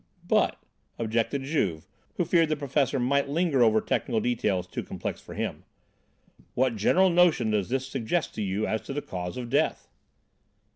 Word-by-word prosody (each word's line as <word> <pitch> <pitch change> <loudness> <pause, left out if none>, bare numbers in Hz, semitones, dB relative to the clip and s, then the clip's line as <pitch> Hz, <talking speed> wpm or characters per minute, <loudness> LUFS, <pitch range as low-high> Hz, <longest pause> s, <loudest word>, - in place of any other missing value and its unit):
"But," - - +2 0.4
objected 115 +4 -1
Juve, 100 - -1 0.3
who - - 0
feared 165 -2 +3
the 155 - +1
professor 140 -1 0
might 140 +3 +1
linger 155 -3 +1
over 110 -2 +5
technical 110 - -1
details 105 -6 0
too 90 - -5
complex - - -5
for - - -10
him, - - -3 0.9
"what 130 -2 +2
general 180 - +4
notion 170 -10 +4
does 105 -2 0
this 130 +1 -1
suggest 135 +6 -2
to - - -4
you 100 +2 -1
as 110 - -1
to - - -7
the 145 - -3
cause 90 +1 -5
of 120 -2 -6
death?" 140 - +1
125 Hz, 165 wpm, -27 LUFS, 110-145 Hz, 0.9 s, over